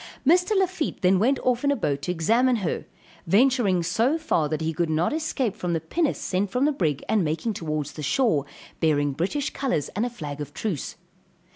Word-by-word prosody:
Mr. 360 Hz, +7 st, +4 dB
Lafitte 370 Hz, -, -1 dB
then 185 Hz, +1 st, +4 dB
went 260 Hz, +7 st, +3 dB
off 250 Hz, 0 st, +1 dB
in 285 Hz, -, +3 dB
a 285 Hz, -, +3 dB
boat 140 Hz, -, -1 dB
to 160 Hz, -, -2 dB
examine 230 Hz, +10 st, +2 dB
her, -, -, -2 dB, 0.4 s
venturing 210 Hz, -3 st, +3 dB
so 240 Hz, -, +1 dB
far 170 Hz, -, 0 dB
that 155 Hz, -, -1 dB
he 160 Hz, 0 st, -1 dB
could 165 Hz, +1 st, -1 dB
not 160 Hz, -, +1 dB
escape 275 Hz, -9 st, -1 dB
from 180 Hz, -5 st, -2 dB
the 165 Hz, -, +1 dB
pinnace 290 Hz, -, -1 dB
sent 205 Hz, -9 st, -1 dB
from 250 Hz, +6 st, +1 dB
the 300 Hz, -, +3 dB
brig, 155 Hz, -, -1 dB
and 215 Hz, -4 st, +2 dB
making 165 Hz, +8 st, -1 dB
towards 155 Hz, -5 st, -3 dB
the 155 Hz, -, -8 dB
shore, 150 Hz, -, +1 dB, 0.3 s
bearing 145 Hz, -3 st, +2 dB
British 200 Hz, -, -2 dB
colors 250 Hz, -, -1 dB
and 210 Hz, -, -2 dB
a 245 Hz, -, 0 dB
flag 150 Hz, -10 st, -7 dB
of 145 Hz, -, -7 dB
truce. 190 Hz, -11 st, -3 dB
195 Hz, 205 wpm, -25 LUFS, 160-265 Hz, 0.4 s, Mr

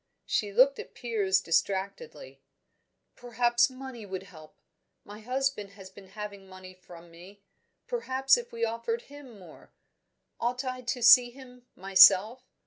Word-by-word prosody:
She 205 Hz, -1 st, -2 dB
looked 260 Hz, +6 st, +3 dB
at -, -, -11 dB
Piers 200 Hz, -6 st, -1 dB
distractedly. 195 Hz, -, -3 dB, 0.7 s
"Perhaps 240 Hz, 0 st, 0 dB
money 260 Hz, -3 st, -10 dB
would 190 Hz, -2 st, -7 dB
help. 155 Hz, -5 st, -16 dB, 0.5 s
My 205 Hz, +1 st, -12 dB
husband 250 Hz, -3 st, -3 dB
has 195 Hz, -2 st, -14 dB
been 195 Hz, -1 st, -15 dB
having 200 Hz, -1 st, -10 dB
money 185 Hz, 0 st, -13 dB
from 175 Hz, -2 st, -16 dB
me; 190 Hz, +4 st, -16 dB, 0.4 s
perhaps 270 Hz, -, +1 dB
if 480 Hz, 0 st, -7 dB
we 230 Hz, 0 st, -2 dB
offered 230 Hz, +1 st, -4 dB
him 280 Hz, -5 st, -14 dB
more? 180 Hz, -5 st, -17 dB, 0.7 s
Ought 250 Hz, +3 st, -3 dB
I 255 Hz, 0 st, -5 dB
to 245 Hz, 0 st, -4 dB
see 245 Hz, +1 st, +7 dB
him, 250 Hz, -1 st, -16 dB
myself? 195 Hz, +6 st, +5 dB
230 Hz, 135 wpm, -27 LUFS, 190-255 Hz, 0.7 s, see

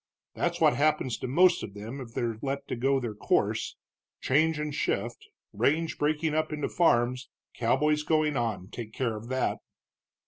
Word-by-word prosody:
That's -, -, -1 dB
what -, -, +5 dB
happens 145 Hz, -4 st, +2 dB
to -, -, -4 dB
most 175 Hz, +7 st, +4 dB
of 100 Hz, -, -7 dB
them 115 Hz, +7 st, -7 dB
if 115 Hz, -2 st, -10 dB
they're 115 Hz, -2 st, -2 dB
let 140 Hz, 0 st, -2 dB, 0.2 s
go 135 Hz, +2 st, +2 dB
their 120 Hz, -4 st, -4 dB
course 105 Hz, -, 0 dB, 0.4 s
change 155 Hz, +4 st, +2 dB
and 150 Hz, -1 st, -3 dB
shift, -, -, -2 dB, 0.3 s
range 155 Hz, +10 st, +1 dB
breaking 150 Hz, +1 st, +1 dB
up 155 Hz, 0 st, 0 dB
into 150 Hz, -1 st, -2 dB
farms, 125 Hz, -6 st, +2 dB, 0.2 s
cowboys 150 Hz, +6 st, +2 dB
going 155 Hz, -1 st, +1 dB
on, 110 Hz, -7 st, -2 dB
take 110 Hz, -2 st, -7 dB
care 115 Hz, -3 st, -1 dB
of 105 Hz, +2 st, -8 dB
that." 130 Hz, +1 st, -1 dB
135 Hz, 165 wpm, -28 LUFS, 120-150 Hz, 0.4 s, what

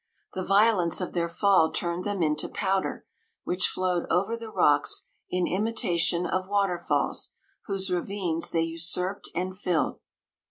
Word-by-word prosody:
The 185 Hz, -, -3 dB
violence 195 Hz, -3 st, +3 dB
of 180 Hz, -, -3 dB
their 170 Hz, -1 st, 0 dB
fall 180 Hz, -2 st, +3 dB
turned 170 Hz, +1 st, -2 dB
them 200 Hz, -4 st, -1 dB
into 150 Hz, -1 st, 0 dB
powder, 195 Hz, -1 st, -1 dB, 0.4 s
which 180 Hz, +1 st, +1 dB
flowed 180 Hz, -2 st, -1 dB
over 195 Hz, +6 st, +1 dB
the 230 Hz, -1 st, -8 dB
rocks -, -, +3 dB, 0.2 s
in 180 Hz, -1 st, 0 dB
imitation 180 Hz, -4 st, 0 dB
of 185 Hz, +1 st, -2 dB
waterfalls, 195 Hz, -4 st, 0 dB, 0.3 s
whose 195 Hz, -1 st, -1 dB
ravines 180 Hz, -2 st, -1 dB
they 165 Hz, -, +1 dB
usurped 170 Hz, +4 st, -1 dB
and 185 Hz, +2 st, -2 dB
filled. 180 Hz, -4 st, -1 dB
185 Hz, 135 wpm, -27 LUFS, 170-195 Hz, 0.4 s, violence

